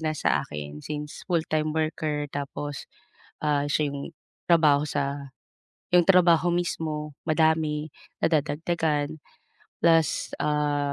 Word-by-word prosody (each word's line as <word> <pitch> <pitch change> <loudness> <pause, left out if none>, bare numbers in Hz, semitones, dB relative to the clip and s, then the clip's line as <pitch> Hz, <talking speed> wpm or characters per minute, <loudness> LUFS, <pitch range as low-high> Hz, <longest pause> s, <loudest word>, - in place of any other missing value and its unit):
na 155 -1 -1
sa 70 - +2
akin, 75 0 -7
since 150 0 -6
full-time 155 -3 0
worker 155 -1 -1
tapos, 145 0 -5 0.5
ah, 145 -2 +1
siya 150 -1 +2
'yung 140 +2 -5 0.3
trabaho 150 -4 +4
sa 140 -2 -3 0.6
'yung 175 -1 +5
trabaho 175 -2 +5
mismo 155 -4 -2
madami, 155 -1 +1 0.3
nadadagdagan, 155 -1 0 0.6
plus, 165 -2 +2
ah, 145 -1 0
150 Hz, 105 wpm, -26 LUFS, 145-160 Hz, 0.6 s, yung